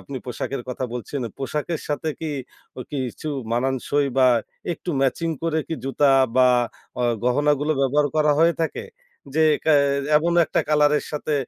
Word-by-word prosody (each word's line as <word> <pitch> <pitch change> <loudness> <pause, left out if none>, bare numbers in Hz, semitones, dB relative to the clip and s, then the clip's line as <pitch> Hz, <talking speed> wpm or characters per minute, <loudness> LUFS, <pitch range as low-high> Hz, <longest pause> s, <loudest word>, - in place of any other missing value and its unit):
আপনি 140 - -8
পোশাকের 125 +1 -4
কথা 130 0 -3
বলছেন। 125 +3 -5 0.2
পোশাকের 150 +4 -3
সাথে 150 +2 -2
কি 160 - -3 0.5
অ - - -4
কিছু 130 +2 -4 0.2
মানান 130 +3 +1
সই 145 0 +2
বা 130 - +6 0.5
একটু 175 - -5
ম্যাচিং 150 +5 0
করে 165 -1 0
কি 165 - -2
জুতা 140 +2 +1 0.3
বা 130 0 +6 0.5
অ - - +1 0.2
গহনাগুলো 145 +3 +2
ব্যবহার 145 +2 +2
করা 150 -1 +3
হয়ে 165 +1 +4
থাকে? 160 - -3 0.5
যে 160 - +2 0.2
ক্যা 155 - +4 0.4
এমনও 170 +2 +3
একটা - - +1
কলার 150 -1 +4
এর - - -7
সাথে 150 +1 -3
145 Hz, 160 wpm, -23 LUFS, 135-155 Hz, 0.5 s, বা